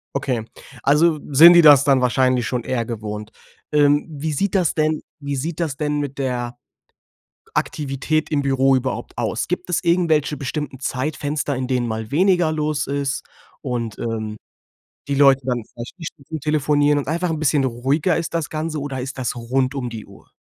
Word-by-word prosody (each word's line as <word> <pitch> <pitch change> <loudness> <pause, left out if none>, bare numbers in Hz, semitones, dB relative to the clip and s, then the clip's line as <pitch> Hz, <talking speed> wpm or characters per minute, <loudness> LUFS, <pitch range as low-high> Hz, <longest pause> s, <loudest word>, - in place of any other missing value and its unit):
Okay, 125 -5 -1 0.4
also 155 +2 +3
sind 165 +6 +9
die 170 -1 +7
das 145 -3 +8
dann 135 -2 +4
wahrscheinlich 125 0 +2
schon 125 -2 -2
eher 120 -2 -2
gewohnt. 105 -2 -6 0.4
Ähm, 145 0 +3
wie 155 0 -4
sieht 190 +7 -1
das 185 -5 +1
denn 155 0 +1 0.2
wie 140 -1 -4
sieht 155 +5 -4
das 160 -5 -1
denn 150 0 -1
mit 140 -1 -5
der 125 -2 -2 1.0
Aktivität 150 +2 -1
im 150 - +1
Büro 135 -1 +2
überhaupt 130 0 -3
aus? - - -2
Gibt 180 +1 -3
es 180 - -1
irgendwelche 160 -4 +2
bestimmten 140 -1 -4
Zeitfenster, 145 +2 -2
in 130 - -2
denen 125 -2 0
mal 110 -1 -4
weniger 175 0 +3
los 150 -1 -1
ist 140 0 -2 0.4
und, 120 -5 -4
ähm, 110 -2 -4 0.7
die 140 - 0
Leute 135 -1 +5
dann 125 -3 -1
vielleicht 120 +10 -9
nicht 165 - -6
Stunden 155 +1 -8
telefonieren 145 0 +2
und 140 - -4
einfach 170 +2 -1
'n 160 - -2
bisschen 145 -2 +2
ruhiger 135 +8 0
ist 165 0 -4
das 165 -2 -2
Ganze, 155 0 -3
oder 135 -2 -4
ist 130 +1 -6
das 125 - -2
rund 130 +3 -1
um 130 -3 -3
die 115 -2 -7
Uhr? - - -18
140 Hz, 180 wpm, -21 LUFS, 130-155 Hz, 1.0 s, sind